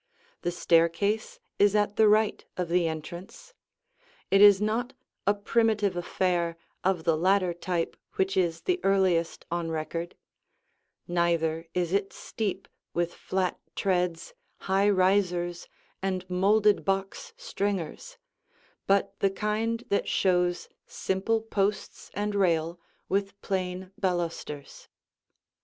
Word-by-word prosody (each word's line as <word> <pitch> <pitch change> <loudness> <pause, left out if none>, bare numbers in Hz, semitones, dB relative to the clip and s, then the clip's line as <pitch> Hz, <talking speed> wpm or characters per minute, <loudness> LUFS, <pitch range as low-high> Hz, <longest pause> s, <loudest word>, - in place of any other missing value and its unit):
The - - -1
staircase 180 - +1 0.2
is 205 0 +5
at 205 -1 +2
the 220 - +5
right 215 0 +3
of 180 -2 -2
the' 175 -1 +2
entrance. 175 - -7 0.8
It 195 +1 +5
is 205 -2 +9
not 225 +5 -1 0.3
a 205 - +4
primitive 210 -2 +1
affair 175 -1 0 0.3
of 185 -3 +1
the 165 -1 +3
ladder 185 +2 +2
type 175 -1 -2 0.2
which 190 +1 0
is 170 -3 +1
the 365 0 0
earliest 185 -4 +2
on 170 -1 -1
record; 165 +2 -4 0.9
neither 170 -2 0
is 175 -1 0
it 200 0 0
steep 200 -3 -4 0.3
with 175 0 0
flat 185 -1 -2 0.2
treads, 180 - -1 0.3
high 195 +1 +2
risers 185 -3 +1 0.3
and 185 -1 -2
molded 200 +3 +3
box 195 - -2
stringers, 205 - -3 0.7
but 195 0 +2
the 195 - +3
kind 220 +4 -1
that 200 - +1
shows 180 -2 +1 0.2
simple 210 +4 -1
posts 205 -2 -2
and 210 +1 -1
rail 170 -3 +1 0.3
with 195 +1 -1
plain 185 -1 -3
balusters. 170 -6 -3
190 Hz, 115 wpm, -28 LUFS, 175-205 Hz, 0.9 s, is